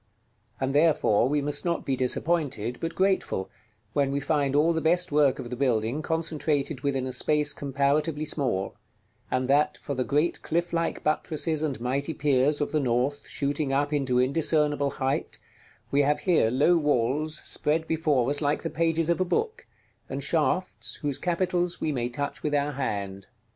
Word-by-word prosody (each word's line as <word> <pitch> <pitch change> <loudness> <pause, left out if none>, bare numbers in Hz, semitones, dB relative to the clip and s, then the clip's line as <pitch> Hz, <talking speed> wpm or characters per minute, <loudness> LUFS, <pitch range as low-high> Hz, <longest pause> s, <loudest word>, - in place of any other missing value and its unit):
And 135 0 -1
therefore 145 -7 +3
we 145 0 0
must 145 0 -2
not 170 -1 -1
be 135 - 0
disappointed, 130 -3 0
but 165 0 -3
grateful, 190 - 0 0.4
when 140 -1 +1
we 140 - 0
find 145 -1 0
all 160 +3 +4
the 160 - -1
best 175 +2 +2
work 145 -2 +3
of 120 - -7
the - - -2
building 120 +1 0
concentrated 155 -4 -1
within 135 -2 -1
a 130 - -4
space 150 +1 +2
comparatively 145 +2 0
small; 125 -11 -1 0.6
and 130 0 0
that, 145 +3 +2
for 140 - -5
the 130 -1 -1
great 150 +6 0
cliff 170 +2 -2
like 165 0 -1
buttresses 155 0 0
and 145 -6 -2
mighty 140 +6 -2
piers 145 +1 +2
of 145 - -1
the 155 - +1
North, 130 +2 -1
shooting 140 0 -1
up 145 +2 0
into 135 -4 +1
indiscernible 145 +2 +2
height, 135 0 -2 0.5
we 140 - +3
have 145 +1 +1
here 170 - +3
low 145 +8 +3
walls 150 +1 0
spread 160 +2 +1
before 155 -6 +1
us 145 - +1
like 145 0 0
the - - -3
pages 165 0 0
of 170 +2 +1
a - - +5
book, 430 - -2 0.4
and 135 +1 -4
shafts 165 +5 0
whose 145 -2 0
capitals 175 0 0
we 155 - -1
may 120 -3 -2
touch 140 +3 -4
with 150 -1 -1
our 145 0 +1
hand. 100 -8 -4
145 Hz, 175 wpm, -26 LUFS, 135-160 Hz, 0.6 s, a